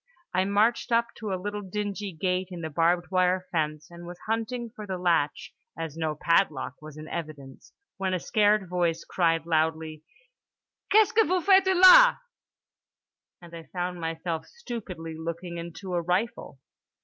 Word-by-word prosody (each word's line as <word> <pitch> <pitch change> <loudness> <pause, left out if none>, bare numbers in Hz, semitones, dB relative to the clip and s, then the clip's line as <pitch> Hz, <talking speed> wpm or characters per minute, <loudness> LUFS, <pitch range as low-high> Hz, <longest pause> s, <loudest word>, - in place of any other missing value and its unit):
I 185 +1 +2
marched 210 +5 +1
up 235 0 +2
to 215 -3 -5
a 190 - -1
little 205 +2 -4
dingy 205 +1 -4
gate 180 +2 -1
in 175 -2 -7
the 160 -1 -5
barbed 175 +3 +1
wire 185 0 +2
fence, 155 -1 -2
and 170 0 -11
was 175 0 -8
hunting 230 +1 -3
for 210 -2 -8
the 190 -1 -3
latch 170 -5 0 0.2
(as 165 -2 -5
no 160 -2 -2
padlock 165 -7 +1
was 155 -1 -11
in 155 0 -9
evidence) 150 -6 -8 0.3
when 190 -1 -1
a - - -2
scared 210 +1 +2
voice 175 -2 -1
cried 165 -3 +1
loudly 160 -1 -1 0.9
"Qu'est 430 +1 +6
ce - - -8
que 445 - +4
vous 370 -3 0
faites 385 -1 +5
là!" 380 +7 +8 1.3
and 170 -1 -13
I 165 - -8
found 180 -1 -4
myself 165 0 -4
stupidly 200 - -7
looking 170 +2 -6
into 170 +2 -7
a 175 - +1
rifle. 180 - -2
180 Hz, 160 wpm, -27 LUFS, 165-210 Hz, 1.3 s, là